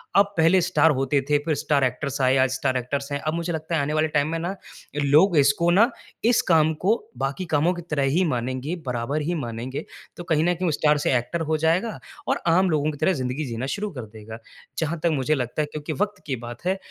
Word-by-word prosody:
अब 200 0 +4
पहले 165 +3 +5
स्टार 160 -2 +3
होते 135 +1 +1
थे, 145 - +4
फिर 155 - +1
स्टार 145 -2 +2
एक्टर्स 130 +2 -1
आए, 130 0 +4
आज 130 0 +3
स्टार 130 -1 0
एक्टर्स 140 +3 -3
हैं। 140 - -1
अब 155 +1 -2
मुझे 170 +1 -2
लगता 160 +1 -3
है 160 - +2
आने 145 +2 -1
वाले 155 0 +2
टाइम 145 0 +2
में 165 - -2
ना 175 +4 -3 0.5
लोग 160 +5 +5
इसको 140 +4 +3
ना, 215 +7 +5 0.3
इस 235 +1 +4
काम 160 -1 +4
को 215 +4 +5 0.2
बाकी 135 +7 -2
कामों 160 +5 +3
की 175 - -6
तरह 145 -2 0 0.2
ही - - +3
मानेंगे, 130 +6 -3
बराबर 125 +4 -2
ही 165 +4 -1
मानेंगे। 120 +4 -5 0.3
तो 175 - -6
कहीं 160 -2 +1
न - - +1
कहीं 180 +1 -1
वो 170 - +2
स्टार 150 0 +2
से 145 - +1
एक्टर 145 +8 -3
हो 160 - +2
जाएगा 180 +8 +1 0.3
और - - +1
आम 180 +3 +4
लोगों 155 -1 +1
की 145 - -9
तरह 155 +6 +2
ज़िंदगी 130 0 -3
जीना 120 0 -4
शुरू 210 +1 -3
कर 120 - -5
देगा। 110 +1 -9 0.4
जहाँ 160 +1 -1
तक 170 - +4
मुझे 150 +2 +1
लगता 125 +2 -2
है, - - 0
क्योंकि 150 -1 -4
वक़्त 205 -1 -2
की 135 - -1
बात 120 +6 -9
है, 190 +1 +1
150 Hz, 240 wpm, -24 LUFS, 135-170 Hz, 0.5 s, पहले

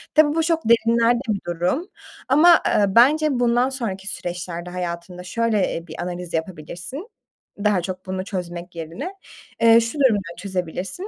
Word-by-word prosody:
Tabii 305 -1 +5
bu 325 - +2
çok 330 0 +1
derinlerde 230 +1 +4
bir 205 -2 +1
durum 180 - -1 0.4
ama, 325 +5 +7
eee, 205 - +3
bence 295 +6 +5
bundan 245 +1 +2
sonraki 210 -8 -5
süreçlerde 175 -1 -5
hayatında 180 0 -5
şöyle, 215 +1 0
eee, 170 +1 -6
bir 160 - -9
analiz 180 -1 -6
yapabilirsin 175 - -5 0.6
daha 205 -4 +3
çok 185 +1 -6
bunu 185 0 -4
çözmek 175 -2 -6
yerine. 170 - -6 0.5
Eee, 230 0 +7
şu 230 +6 -4
durumda 205 -10 +2
çözebilirsin. 190 - -4
195 Hz, 145 wpm, -22 LUFS, 175-245 Hz, 0.6 s, ama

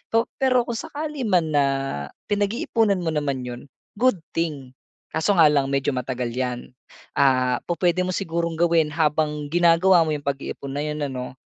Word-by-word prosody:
So 230 +1 +4 0.2
pero 255 -2 +3
kung 235 - -3
sakali 300 -1 -5
man 175 -6 +2
na, 145 -1 +4 0.7
pinag-iipunan 205 0 +1
mo 160 - 0
naman 140 -4 -1
'yon, 120 0 -6 0.4
good 255 -6 +3 0.2
thing. 150 -6 -3 0.4
Kaso 175 +5 +1
nga 160 - +7
lang 140 -2 +1
medyo 140 0 0
matagal 125 -1 -3
'yan. 125 0 -4 0.4
Ah, 130 -2 +2
pu-puwede 175 +1 +1
mo 185 - -1
sigurong 170 -3 -2
gawin 170 -2 +3
habang 150 -1 0
ginagawa 175 +1 +5
mo 160 - +1
'yong 145 -2 -3
pag-iipon 140 0 -4
na 145 - -2
'yon 150 0 -3
ano, 125 -1 -5
155 Hz, 160 wpm, -23 LUFS, 140-180 Hz, 0.7 s, nga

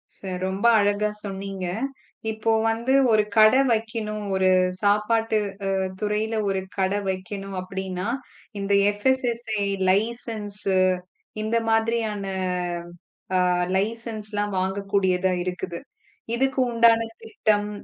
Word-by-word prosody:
ச - - -18 0.2
ரொம்ப 190 +3 -2
அழகா 205 +1 +2
சொன்னீங்க. 195 -1 -5 0.7
இப்போ 220 +1 0 0.2
வந்து 230 +4 0 0.2
ஒரு 215 -1 +5
கடை 220 +5 +7
வைக்கணும். 220 -2 -2
ஒரு 190 0 +3 0.3
சாப்பாட்டு 215 +2 +2 0.4
அ - - +1 0.2
துறையில 215 +2 -1
ஒரு 195 -1 0 0.2
கடை 190 +1 +1
வைக்கணும் 195 +1 -5
அப்படின்னா 185 0 -4 0.5
இந்த 200 0 -1 0.3
FSSAI 235 -3 0 0.2
லைசன்ஸ் 215 0 -2 0.8
இந்த 220 +2 0
மாதிரியான 225 -2 +1 1.2
அ - - +2 0.3
லைசன்ஸ் 220 +1 -3
எல்லாம் 205 -1 -1
வாங்கக்கூடியதா 190 -1 +1
இருக்குது. 180 -1 -4 0.6
இதுக்குண்டான 235 -3 +3 0.2
திட்டம் 210 -1 0
210 Hz, 100 wpm, -24 LUFS, 195-225 Hz, 1.2 s, கடை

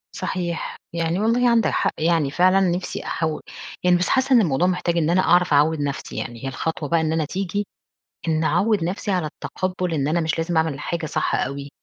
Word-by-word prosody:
صحيح. 175 -2 -3 0.2
يعني 170 +1 -1
والله 235 +3 +3
عندك 230 -2 +3
حق - - +1
يعني 160 -3 +1
فعلًا 185 +4 +4
نفسي 180 -1 -1
أحو 160 -2 -2 0.4
يعني 180 0 +5
بس 180 - -1
حاسّة 265 0 +2
إن 235 - +7
الموضوع 170 -1 +2
محتاج 180 -2 0
إن 160 -1 +2
أنا 180 +2 +4
أعرف 180 -3 +3
أعوّد 150 +2 +3
نفسي. 140 -1 -4
يعني 120 +2 -5
هي - - -3
الخطوة 155 +1 -3
بقى 165 -1 +3
إن 160 0 0
أنا 160 -1 0
تيجي 195 +4 -3 0.6
إنّي 160 0 +1
أعوّد 210 -2 +2
نفسي 190 +4 -3
على 180 -4 0
التَقبُّل 180 +3 -3
إن 140 -2 0
أنا 170 +3 +1
مش 160 0 -1
لازم 165 +1 -1
أعمل 160 -2 +2
الحاجة 165 +3 -4
صح - - -1
أوي، 140 +2 -2
170 Hz, 205 wpm, -22 LUFS, 155-185 Hz, 0.6 s, إن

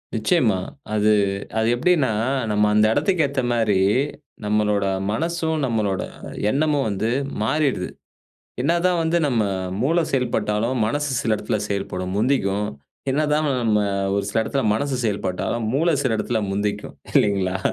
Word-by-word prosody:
நிச்சயமா. 110 - +2 0.4
அது 105 0 +3 0.5
அது 110 0 +2
எப்பிடின்னா, 145 +1 +2 0.4
நம்ம 105 0 +3
அந்த 105 0 +5
இடத்துக்கு 185 -5 +2
ஏத்தமாரி 120 -7 +1 0.7
நம்மளோட 105 -1 +1 0.3
மனசும், 160 +4 -1
நம்மளோட 105 -6 0 0.5
எண்ணமும் 145 -2 +1
வந்து 105 +2 -1 0.3
மாறிடுது. 135 -7 0 0.7
என்னதான் 170 +4 +2
வந்து 165 +1 +2
நம்ம 115 -6 +1 0.4
மூளை 165 +5 +2
செயல்பட்டாலும் 115 -2 0
மனசு 145 +3 -1
சில 110 -2 +1
இடத்தில 110 0 -2
செயல்படும். 95 -2 -3
முந்திக்கும். 105 -5 +1 0.4
என்னதான் 150 +1 +1 0.2
நம்ம 105 -2 +3 0.4
ஒரு 100 - 0
சில 110 +2 +1
இடத்தில 135 +4 -1
மனசு 140 +4 -1
செயல்பட்டாலும், 105 +2 -2
மூளை 165 +3 +2
சில 125 -4 +1
இடத்தில 110 0 -1
முந்திக்கும். 105 +1 -3 0.2
இல்லூங்களா! 95 -2 +2
115 Hz, 120 wpm, -22 LUFS, 105-145 Hz, 0.7 s, அந்த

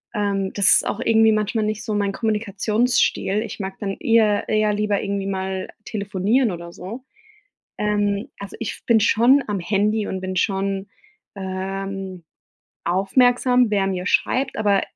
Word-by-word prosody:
Ähm, 200 -2 -1
das 200 -1 +2
ist - - +3
auch 215 - -2
irgendwie 225 -2 +4
manchmal 215 +1 0
nicht 215 0 -3
so 215 - -2
mein 200 -1 0
Kommunikationsstil. 215 0 0
Ich 225 - -8
mag 190 0 -5
dann 195 -2 -3
eher 220 -3 +2
eher 215 -1 +2
lieber 210 -1 0
irgendwie 200 -1 -2
mal 190 -1 -3 0.2
telefonieren 205 +4 0
oder 170 -1 -8
so. 220 +8 -8 0.7
Ähm, 205 0 0
also, 200 0 -8
ich 230 - -6
bin 230 -2 +4
schon 240 +6 +4
am 205 -2 -2
Handy 210 +3 0
und 190 0 -4
bin 185 0 -4
schon, 195 0 -1 0.5
ähm, 190 -1 -5 0.6
aufmerksam, 245 +6 +3
wer 195 -2 +1
mir 180 -1 -3
schreibt, 265 +5 +1
aber 205 -2 +2
205 Hz, 150 wpm, -22 LUFS, 195-220 Hz, 0.7 s, irgendwie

